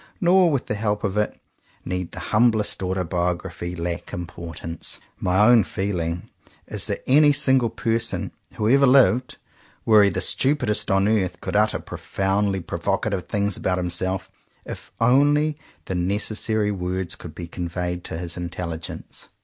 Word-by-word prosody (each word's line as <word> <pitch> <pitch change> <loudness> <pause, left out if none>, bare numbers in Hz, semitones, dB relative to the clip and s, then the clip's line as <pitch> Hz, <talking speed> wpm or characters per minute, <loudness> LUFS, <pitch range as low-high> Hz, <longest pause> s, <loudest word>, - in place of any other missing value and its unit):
Nor 180 0 +5
with 140 -5 -1
the - - -2
help 105 0 -1
of 100 -1 -1
it 105 0 -1 0.5
need 90 -1 -3
the - - -7
humblest 110 -2 +3
autobiography 90 -1 -2
lack 85 0 -4
importance. 85 -1 -6 0.2
My 95 +3 +3
own 120 -3 +6
feeling 90 -3 -3 0.4
is - - -2
that - - -3
any 145 +3 +6
single 130 -4 +3
person 115 +1 -1 0.2
who 105 - -1
ever 135 +3 +5
lived, 125 -1 +4 0.5
were 110 -2 +7
he 100 - +5
the 90 - -2
stupidest 130 -6 +1
on 95 +1 +3
earth, 95 -5 0
could - - -5
utter 105 +1 +3
profoundly 95 0 -1
provocative 100 +2 -2
things 100 -2 -1
about 90 -1 -1
himself 90 +1 -2 0.2
— - - -37
if - - -9
only 145 +5 +3 0.3
the - - -4
necessary 105 +3 0
words 90 -1 -3
could 80 -3 -10
be 85 - -6
conveyed 90 +1 -4
to - - -5
his 85 0 -5
intelligence. 85 -2 -6
100 Hz, 150 wpm, -23 LUFS, 90-115 Hz, 0.5 s, were